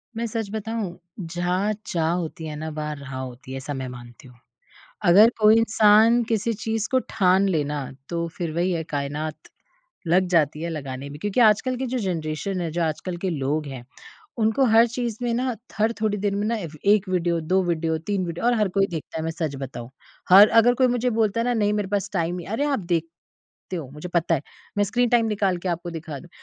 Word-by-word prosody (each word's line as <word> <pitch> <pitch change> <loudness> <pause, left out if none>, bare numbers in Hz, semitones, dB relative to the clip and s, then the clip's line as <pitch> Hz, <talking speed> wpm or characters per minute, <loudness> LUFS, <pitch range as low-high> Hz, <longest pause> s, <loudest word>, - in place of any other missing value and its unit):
मैं 230 +1 -2
सच 225 -2 -3
बताऊँ, 220 -3 -4 0.2
जहाँ 180 +4 -1
चाह 165 -5 0
होती 165 -2 -3
है 150 - -5
ना 155 +1 -5
वहाँ 150 -1 -4
राह 140 -2 -9
होती 130 0 -8
है 135 - -4
ऐसा 145 +2 -5
मैं 130 -1 -4
मानती 120 0 -12
हूँ। 125 - -16 0.7
अगर 200 +6 +8
कोई 215 +1 +6
इंसान 225 +1 +5
किसी 230 0 0
चीज़ 220 0 -2
को 260 - +4
ठान 190 -2 +3
लेना 145 -5 -1 0.2
तो 170 -1 -2
फिर 170 -3 -2
वही 175 +2 +1
है 165 -2 -1
कायनात 150 +1 -4 0.6
लग 180 +3 +3
जाती 155 -3 +2
है 170 - -2
लगाने 140 -3 -5
में। 145 - -9
क्योंकि 205 +5 0
आजकल 235 +3 +4
की 260 +1 -3
जो 255 +1 -2
जनरेशन 180 - -2
है, 170 -2 -2
जो 170 +2 -1
आजकल 165 +3 -2
के 190 - +1
लोग 150 0 -1
हैं 130 -3 -7 0.5
उनको 220 +4 +2
हर 225 0 +6
चीज़ 235 -1 -3
में 240 -1 0
ना, 250 +1 0 0.2
हर 220 +2 +3
थोड़ी 215 -1 0
देर 200 0 -1
में 205 +1 -1
ना 230 +1 0
एव 170 -8 -6
1 205 -1 +4
वीडियो 175 -2 0
2 185 +4 +1
वीडियो 165 -2 0
3 200 -2 0
वीडियो 170 +4 -5
और 245 - +4
हर 210 -2 +2
कोई 195 0 +4
देखता 160 -1 -5
है 160 - -3
मैं 165 - -1
सच 160 -4 -3
बताऊँ। 125 -3 -7 0.4
हर 200 +3 +10
अगर 230 +2 +5
कोई 255 +1 +3
मुझे 245 0 +1
बोलता 220 -1 +1
है - - 0
ना 245 - +1
नहीं 210 -2 +2
मेरे 210 -2 -1
पास 200 -1 -1
टाइम 175 -1 -1
अरे 275 +6 0
आप 285 -2 +1
देख 170 -4 -1 0.7
ते - - -3
हो 155 -7 -5
मुझे 150 +5 -8
पता 170 -1 +2
है। 140 - -3 0.4
मैं 205 - +4
स्क्रीन 245 +4 +1
टाइम 235 -1 +4
निकाल 200 -4 0
के - - +1
आपको 175 0 -3
दिखा 160 -3 -6
दूँ। 175 - -15
180 Hz, 220 wpm, -24 LUFS, 155-220 Hz, 0.7 s, हर